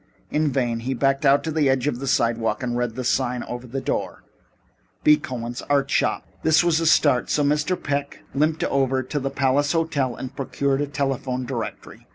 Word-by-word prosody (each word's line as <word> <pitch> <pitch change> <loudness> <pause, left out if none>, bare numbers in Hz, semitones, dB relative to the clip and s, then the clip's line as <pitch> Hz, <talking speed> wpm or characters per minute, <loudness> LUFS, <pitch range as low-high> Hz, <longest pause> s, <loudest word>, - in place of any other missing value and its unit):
In 150 -1 +1
vain. 120 -3 0
He 130 +3 -3
backed 135 +3 +2
out 140 +1 +4
to 160 - -2
the 150 -3 +2
edge 130 -2 +1
of 145 -5 -1
the 135 - -5
sidewalk 115 -2 +1
and 120 -1 -2
read 120 -2 -1
the 130 - -4
sign 125 0 0
over 120 +1 -7
the 135 +3 -3
door: - - -3 0.8
B. 150 - +7
Cohen's 120 -4 -5
Art 140 -1 +2
Shop - - +1 0.2
This 160 +2 +4
was 170 -2 +2
a 165 - 0
start, 140 -6 +4
so 150 - +2
Mr. 150 +5 +1
Peck 140 0 -3
limped 155 +3 +1
over 135 -4 +1
to 145 +3 -3
the 135 0 -2
Palace 140 +1 +1
Hotel 145 -7 0
and 130 +1 -7
procured 140 0 -1
a 145 - -1
telephone 135 -3 -2
directory. 120 -3 -6
135 Hz, 200 wpm, -23 LUFS, 125-145 Hz, 0.8 s, B